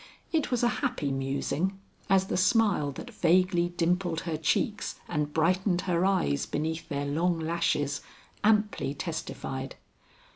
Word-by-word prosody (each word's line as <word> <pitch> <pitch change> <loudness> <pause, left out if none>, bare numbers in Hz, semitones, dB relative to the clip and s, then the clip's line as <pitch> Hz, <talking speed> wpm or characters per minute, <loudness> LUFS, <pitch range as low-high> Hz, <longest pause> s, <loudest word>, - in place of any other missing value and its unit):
It 315 -3 +1
was 245 -2 0
a - - +5
happy 250 - -1
musing, 140 +7 -1 0.3
as 190 -1 +4
the - - -2
smile 190 -6 +3
that 245 - -9
vaguely 175 -1 +3
dimpled 175 -1 0
her 165 -2 -3
cheeks 155 0 0
and 150 0 -1
brightened 180 +3 +2
her 180 -1 +1
eyes 70 - +1
beneath 160 +2 -3
their 145 -1 -2
long 165 +5 +1
lashes, 160 -3 0 0.4
amply 210 -9 +2
testified. 135 -5 -5
170 Hz, 135 wpm, -28 LUFS, 150-190 Hz, 0.4 s, a